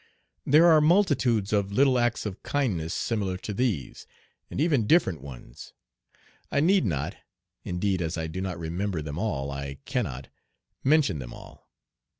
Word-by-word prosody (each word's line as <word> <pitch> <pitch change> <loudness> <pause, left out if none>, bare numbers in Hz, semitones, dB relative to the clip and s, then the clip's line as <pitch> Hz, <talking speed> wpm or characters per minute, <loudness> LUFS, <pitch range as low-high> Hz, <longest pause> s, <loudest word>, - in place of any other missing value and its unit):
There 155 +5 +6
are 160 -3 +6
multitudes 145 - +2
of 100 -1 +1
little 130 +3 +3
acts 120 -1 0
of 105 -1 -5
kindness 100 - -1
similar 100 -3 -2
to 105 - -6
these, 100 - -2 0.4
and - - -5
even 145 -9 +2
different 95 - +3
ones. 65 -3 -11 0.8
I - - +2
need 180 0 +3
not 80 +1 -2 0.5
indeed 95 0 -1
as 80 0 -2
I 80 - -2
do 80 +4 -5
not 95 -2 -3
remember 85 +1 -3
them 75 +1 -5
all 70 -11 -2
I 70 0 -5
cannot 65 +3 -3 0.5
mention 140 - +3
them - - -8
all. - - -15
100 Hz, 155 wpm, -27 LUFS, 80-130 Hz, 0.8 s, There